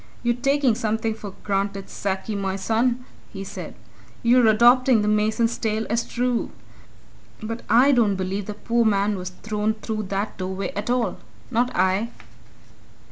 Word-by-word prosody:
"You're 240 Hz, 0 st, +2 dB
taking 275 Hz, 0 st, +2 dB
something 220 Hz, 0 st, -1 dB
for 205 Hz, -3 st, -9 dB
granted, 195 Hz, -1 st, -1 dB
Sackie, 195 Hz, +2 st, -3 dB
my 195 Hz, -1 st, -2 dB
son!" 235 Hz, +5 st, 0 dB, 0.3 s
he 195 Hz, -1 st, -6 dB
said. 195 Hz, -, -8 dB, 0.5 s
"You're 240 Hz, 0 st, +5 dB
adopting 240 Hz, +1 st, +5 dB
the -, -, 0 dB
mason's 215 Hz, +2 st, +2 dB
tale 220 Hz, 0 st, -1 dB
as 230 Hz, +1 st, +1 dB
true. 245 Hz, -1 st, -1 dB, 0.9 s
But 230 Hz, +2 st, -4 dB
I 255 Hz, +5 st, +6 dB
don't 225 Hz, -6 st, +3 dB
believe 190 Hz, +1 st, -3 dB
the 210 Hz, -, -5 dB
poor 235 Hz, +2 st, +1 dB
man 205 Hz, -1 st, +2 dB
was 180 Hz, -1 st, -5 dB
thrown 210 Hz, +3 st, -2 dB
through 215 Hz, -1 st, -4 dB
that 200 Hz, +1 st, -3 dB
doorway 190 Hz, +1 st, -3 dB
at 205 Hz, +4 st, -3 dB
all 245 Hz, -1 st, 0 dB, 0.3 s
not 245 Hz, +1 st, +1 dB
I!" 190 Hz, +5 st, +2 dB
215 Hz, 150 wpm, -23 LUFS, 200-235 Hz, 0.9 s, I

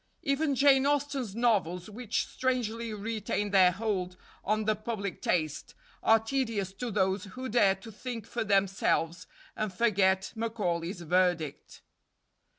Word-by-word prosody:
Even 280 Hz, +1 st, +1 dB
Jane 275 Hz, 0 st, +5 dB
Austen's 280 Hz, -7 st, -1 dB
novels, 195 Hz, -7 st, +1 dB
which 220 Hz, +1 st, -2 dB
strangely 235 Hz, -3 st, -2 dB
retain 210 Hz, -1 st, -2 dB
their 190 Hz, -2 st, +6 dB
hold 185 Hz, -2 st, -2 dB, 0.3 s
on 215 Hz, +1 st, 0 dB
the 215 Hz, 0 st, +2 dB
public 210 Hz, -4 st, -4 dB
taste, 155 Hz, -3 st, -1 dB, 0.3 s
are 225 Hz, -, +6 dB
tedious 225 Hz, -5 st, -2 dB
to 245 Hz, +5 st, -4 dB
those 190 Hz, -1 st, 0 dB
who 255 Hz, +7 st, -7 dB
dare 205 Hz, -4 st, +4 dB
to 210 Hz, +4 st, -12 dB
think 230 Hz, 0 st, -6 dB
for 240 Hz, -, -3 dB
themselves 195 Hz, -4 st, +1 dB, 0.3 s
and 215 Hz, -2 st, -2 dB
forget 190 Hz, -2 st, +2 dB
Macaulay's 190 Hz, -6 st, -2 dB
verdict. 175 Hz, -3 st, 0 dB
210 Hz, 130 wpm, -29 LUFS, 190-235 Hz, 0.3 s, their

